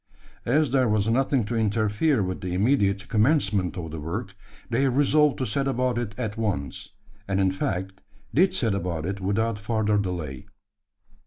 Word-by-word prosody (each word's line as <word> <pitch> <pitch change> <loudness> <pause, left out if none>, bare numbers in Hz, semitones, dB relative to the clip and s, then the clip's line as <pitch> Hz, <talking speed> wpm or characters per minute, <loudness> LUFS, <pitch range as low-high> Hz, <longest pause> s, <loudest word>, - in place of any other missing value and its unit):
As 145 +2 +2
there 130 -3 +3
was 105 0 +1
nothing 130 0 +2
to 115 - -3
interfere 110 +4 +1
with 95 +1 -4
the 90 -2 -3
immediate 100 -2 +2
commencement 105 - +2
of 80 -3 -5
the 80 - -5
work, 95 +7 -4 0.3
they 135 +3 +1
resolved 145 +2 +3
to 130 - -1
set 135 +6 -1
about 125 -2 0
it 110 -5 -4
at 110 -4 -3
once; 80 - -3 0.4
and 95 -1 0
in 95 -1 +3
fact 95 0 -3 0.3
did 185 +6 +4
set 115 -5 0
about 85 -5 -2
it 95 +1 -4
without 105 +3 0
farther 105 -1 +1
delay. 90 -5 -4
105 Hz, 165 wpm, -25 LUFS, 95-125 Hz, 0.4 s, did